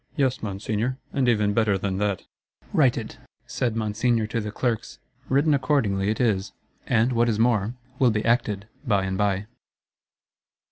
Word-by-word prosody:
—'Yes, 130 -3 +1
Monseigneur; 110 +4 -2 0.2
and 130 -3 +2
even 105 -3 +2
better 105 -3 +2
than 95 0 -2
that.'—'Write 105 - -1
it,' 110 -2 -6 0.3
said 125 -2 -2
Monseigneur 110 +1 +1
to 115 +2 -2
the 105 - -4
Clerks.—Written 130 +5 -1
accordingly 115 -8 +1
it 110 - -1
is; 100 -5 +1 0.3
and 115 +3 +2
what 120 0 +3
is 110 - 0
more, 115 -1 +2 0.2
will 130 -3 +5
be 105 -1 -1
acted 110 -4 +1 0.2
by 105 -8 +1
and 95 0 -2
by. 100 0 0
110 Hz, 145 wpm, -25 LUFS, 105-125 Hz, 0.3 s, will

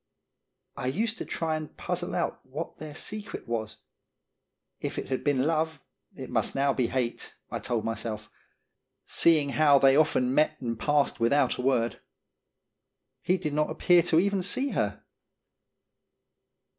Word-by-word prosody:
I 125 - -4
used 220 - -1
to - - -4
try 160 -1 -2
and 155 -1 -7
puzzle 175 0 -3
out 175 - -2
what 140 +6 -6
their 150 -1 -8
secret 205 -2 -5
was. 115 -2 -3 1.0
If - - -4
it - - -4
had 130 - -2
been 140 -3 +2
love, 160 -1 0 0.4
it - - -8
must - - 0
now 140 0 +2
be 125 -3 +1
hate, 125 -2 -3 0.2
I - - -2
told 115 -2 -2
myself, 110 -1 -3 0.8
seeing 155 -4 +3
how 145 0 +5
they 135 0 +5
often 135 -4 +3
met 150 +2 +2
and 115 -3 -4
passed 145 -1 +1
without 130 +3 +2
a - - -3
word. 125 -3 +1 1.2
He 185 - +2
did 155 -5 -3
not 150 +1 +1
appear 175 -1 +4
to 165 -1 +3
even 200 +1 +1
see 260 +9 -1
her. - - -2
145 Hz, 150 wpm, -28 LUFS, 125-165 Hz, 1.2 s, how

